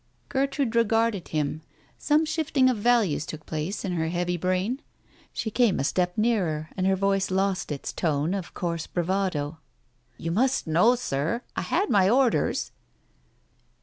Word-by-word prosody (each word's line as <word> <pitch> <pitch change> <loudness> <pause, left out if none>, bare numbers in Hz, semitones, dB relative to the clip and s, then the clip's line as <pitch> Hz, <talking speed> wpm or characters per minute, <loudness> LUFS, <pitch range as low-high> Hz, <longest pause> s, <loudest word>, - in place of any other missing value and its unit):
Gertrude 275 -3 0
regarded 225 -4 +2
him. 155 0 -2 0.4
Some 305 +1 +3
shifting 290 -5 +2
of 245 - -2
values 210 -9 +2
took 155 -1 -8
place 160 +7 -3
in 190 - -2
her 160 -2 -1
heavy 175 +1 -1
brain. 185 - -1 0.5
She 220 - -3
came 235 -4 +2
a - - 0
step 180 +5 0
nearer, 180 -9 0
and 185 0 0
her 190 - +3
voice 195 0 +1
lost 190 -2 0
its 140 - -4
tone 155 +1 0
of 195 -3 -5
coarse 170 -2 -3
bravado. 175 -4 -1 0.6
"You 165 - -3
must 255 +8 +1
know, 180 +10 +4
Sir, 165 - -2
I - - -1
had 405 - 0
my 190 -1 +4
orders? 250 +1 +2
190 Hz, 150 wpm, -26 LUFS, 165-235 Hz, 0.6 s, know